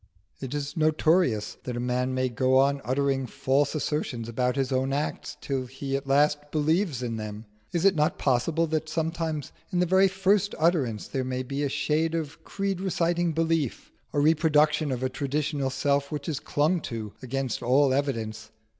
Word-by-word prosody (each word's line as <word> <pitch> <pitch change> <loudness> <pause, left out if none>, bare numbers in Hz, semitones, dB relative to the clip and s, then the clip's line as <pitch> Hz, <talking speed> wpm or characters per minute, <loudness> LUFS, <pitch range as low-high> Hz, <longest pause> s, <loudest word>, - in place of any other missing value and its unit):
It 135 +1 -5
is 145 +1 -4
notorious 155 - +2
that 125 -1 -4
a - - -2
man 125 +1 -1
may 130 0 +1
go 130 +2 +2
on 140 +1 +3
uttering 135 0 0
false 140 +3 +1
assertions 140 -6 -2
about 125 +2 0
his 135 -2 -1
own 130 +1 0
acts 145 +2 -3
till 130 -2 -2
he 135 +2 -4
at 135 0 -3
last 145 +1 +2
believes 155 - +1
in 115 -2 -3
them: 105 0 -6 0.3
is 170 +1 0
it 195 - +6
not 150 -3 +1
possible 150 +6 +1
that 155 0 -2
sometimes 160 -2 -2 0.2
in 180 - -1
the 180 - +3
very 190 +2 +5
first 195 +2 +1
utterance 150 - +1
there 130 - -2
may 130 0 -2
be 135 +2 -4
a 145 - 0
shade 160 +4 0
of 155 -3 -4
creed 195 -2 -3
reciting 175 -2 +1
belief, 160 -4 -1 0.2
a 145 - 0
reproduction 155 -1 +3
of 130 0 -2
a - - +2
traditional 140 +1 -1
self 140 +1 0
which 145 -2 -4
is 150 -5 -2
clung 155 +3 +1
to 110 -5 -5
against 130 -1 -3
all 135 +2 +3
evidence? 110 -6 -2
140 Hz, 180 wpm, -27 LUFS, 130-160 Hz, 0.3 s, it